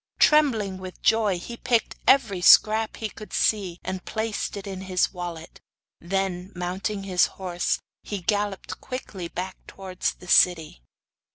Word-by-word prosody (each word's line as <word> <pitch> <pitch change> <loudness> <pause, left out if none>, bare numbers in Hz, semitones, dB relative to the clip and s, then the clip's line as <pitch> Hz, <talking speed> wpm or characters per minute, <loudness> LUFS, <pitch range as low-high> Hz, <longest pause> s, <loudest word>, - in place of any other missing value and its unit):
Trembling 225 -11 +3
with 185 -1 -10
joy, 215 -4 +3
he 235 +7 -7
picked 230 -2 0
every 220 -9 +4
scrap 215 +4 +5
he 220 - -3
could 215 0 -12
see, 190 -5 0
and 190 0 -4
placed 220 -2 -3
it 200 - -7
in 190 -2 -6
his 185 -1 0
wallet. 175 -3 -7 0.4
Then, 190 +1 -2
mounting 190 +3 -3
his 185 -2 +3
horse, 180 -2 -1 0.2
he 205 - -5
galloped 205 +1 -2
quickly 205 -8 -6
back 185 +2 -5
towards 190 -1 -4
the 180 - -15
city. 165 - +4
190 Hz, 145 wpm, -25 LUFS, 180-215 Hz, 0.4 s, scrap